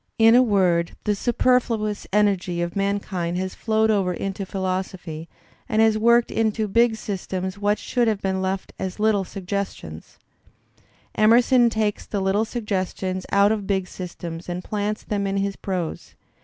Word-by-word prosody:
In 225 0 +6
a 245 - +7
word, 185 -7 +2
the 210 - +1
superfluous 230 -2 +1
energy 195 -4 +1
of 175 0 -2
mankind 195 -3 -1
has 185 0 -3
flowed 220 0 +1
over 195 -4 +1
into 195 +1 -4
philosophy, 185 -4 -4 0.4
and 215 -3 +1
has 220 -1 +5
worked 235 +2 +3
into 220 -1 0
big 230 +2 +3
systems 190 -2 -4
what 205 +1 +1
should 245 -2 0
have 215 -3 +1
been 190 -1 -1
left 190 0 -3
as 190 +1 -4
little 210 -2 +2
sugges 195 +1 -4
tions/' 80 0 -11 1.0
Emerson 240 +3 +5
takes 215 -2 -1
the 205 - -2
little 195 +3 +1
suggestions 190 -4 -3
out 200 +1 +5
of 210 -3 -2
big 190 -2 0
systems 175 -2 -7
and 175 +1 -4
^plants 210 0 -3
them 200 -2 -1
in 195 0 -1
his 195 0 -1
prose. 180 -4 -4
200 Hz, 155 wpm, -23 LUFS, 185-220 Hz, 1.0 s, a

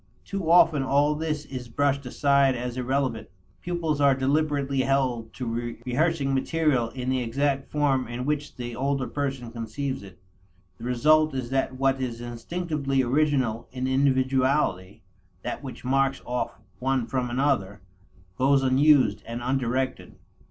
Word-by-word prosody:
Too 195 -5 -3
often 165 -4 +6
all 140 +3 +2
this 150 -1 -3
is 130 -3 -7
brushed 140 +2 0
aside 140 0 +3
as 120 0 -4
irrelevant; 130 -2 -1 0.3
pupils 165 -4 -1
are 140 -1 +5
deliberately 140 0 0
held 130 -4 0
to 120 -1 -4
rehearsing 140 +2 +1
material 135 -3 +1
in 130 +1 -3
the 130 -1 0
exact 135 +3 -1
form 135 -4 +1
in 120 +2 -5
which 150 0 -2
the 120 -2 -6
older 135 +1 -1
person 135 -5 -3
conceives 120 +4 -4
it. 95 -2 -13 0.6
The 115 - -7
result 155 +5 +3
is 125 -2 -4
that 135 -1 0
what 135 0 +1
is 120 -3 -3
instinctively 135 +3 -2
original 130 -4 +1
in 130 0 -3
individuality, 130 -7 +1 0.4
that - - -4
which 130 -2 -9
marks 135 +1 +2
off 125 0 -3 0.2
one 130 -1 0
from 125 0 -2
another, 120 -7 0 0.6
goes 135 +1 +4
unused 130 -4 +4
and 120 +1 -5
undirected. 130 0 -1
135 Hz, 140 wpm, -26 LUFS, 125-140 Hz, 0.6 s, often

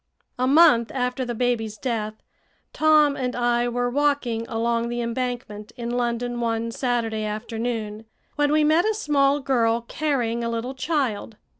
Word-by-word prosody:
A 255 - +2
month 275 -6 +5
after 250 0 -1
the 240 -1 -4
baby's 225 -3 -1
death, 220 -4 -3 0.6
Tom 305 -2 +4
and 250 -2 -3
I 240 0 +1
were 245 0 -1
walking 250 -4 0
along 230 +1 0
the 240 0 -3
Embankment 235 -3 -4
in 235 -1 -4
London 240 0 -1
one 230 0 -1
Saturday 230 -3 -1
afternoon, 220 0 -4 0.3
when 290 -1 +2
we 305 0 +3
met 310 +3 +4
a 435 0 +1
small 285 -6 +2
girl 235 -4 +1
carrying 235 -3 -1
a 230 - -1
little 230 +3 -3
child. 260 -7 -2
240 Hz, 150 wpm, -24 LUFS, 230-270 Hz, 0.6 s, month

